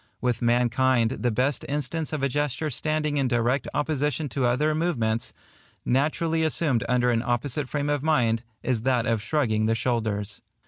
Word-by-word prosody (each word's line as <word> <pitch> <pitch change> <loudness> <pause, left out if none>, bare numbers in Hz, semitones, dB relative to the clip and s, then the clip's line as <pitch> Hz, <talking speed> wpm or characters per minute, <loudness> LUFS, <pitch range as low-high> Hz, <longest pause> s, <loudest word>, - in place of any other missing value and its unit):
With 125 -2 -1
mankind 120 0 +2
the 125 - -1
best 125 +4 0
instance 150 +2 -2
of 150 -3 -3
a - - +4
gesture 145 +2 -1
standing 155 +2 -1
in 135 -2 +2
direct 120 +2 +1
opposition 150 0 -1
to 130 +1 -1
other 150 +6 +2
movements, 125 -9 0 0.5
naturally 155 +5 +1
assumed 155 -6 +1
under 125 0 +3
an 115 -1 +1
opposite 125 +3 -1
frame 145 +2 -2
of 145 -2 0
mind, 125 -7 +2 0.2
is 125 -3 0
that 125 -1 +1
of 115 -2 0
shrugging 110 -5 0
the 115 - +2
shoulders. 110 -4 -2
130 Hz, 165 wpm, -25 LUFS, 120-150 Hz, 0.5 s, a